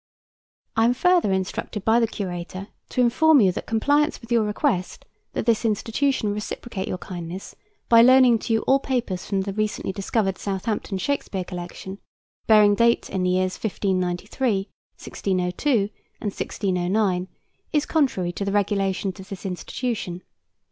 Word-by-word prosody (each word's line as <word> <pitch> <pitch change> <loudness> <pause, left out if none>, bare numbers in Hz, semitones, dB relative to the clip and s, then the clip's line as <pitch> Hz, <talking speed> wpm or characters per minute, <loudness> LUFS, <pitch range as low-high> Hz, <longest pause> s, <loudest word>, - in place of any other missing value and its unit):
I 225 0 +4
am 245 +1 +3
further 355 - +3
instructed 190 +2 -3
by 225 +1 +5
the 230 - +2
Curator 185 -1 -5 0.2
to 250 - 0
inform 290 +5 +5
you 195 -5 +5
that - - -6
compliance 290 +7 +2
with 230 0 -14
your 230 -2 +4
request 210 -2 -1 0.3
that - - -2
this 230 -1 +2
institution 225 +1 0
reciprocate 210 -1 -5
your - - -2
kindness 180 0 -7 0.3
by 230 -1 +7
loaning 250 -1 +6
to 225 - -2
you 225 - +2
all 270 +1 +4
papers 245 -10 -2
from 195 -1 0
the 195 0 -4
recently 215 -1 -2
discovered 195 0 -1
Southampton 200 0 -2
Shakespeare 195 -3 -2
Collection, 180 +2 -7 0.5
bearing 210 -2 +6
date 235 +3 +2
in 190 - -1
the 180 - +1
years 185 0 +1
1593, 195 +2 -1 0.3
1602, 185 +6 -2 0.5
and 210 - -2
1609, 185 -1 -1 0.4
is 300 -2 +1
contrary 255 - +1
to 190 - -4
the 200 - -1
regulations 195 -1 0
of 190 +1 -11
this 195 0 -8
institution. 185 -1 -4
205 Hz, 150 wpm, -24 LUFS, 185-235 Hz, 0.5 s, by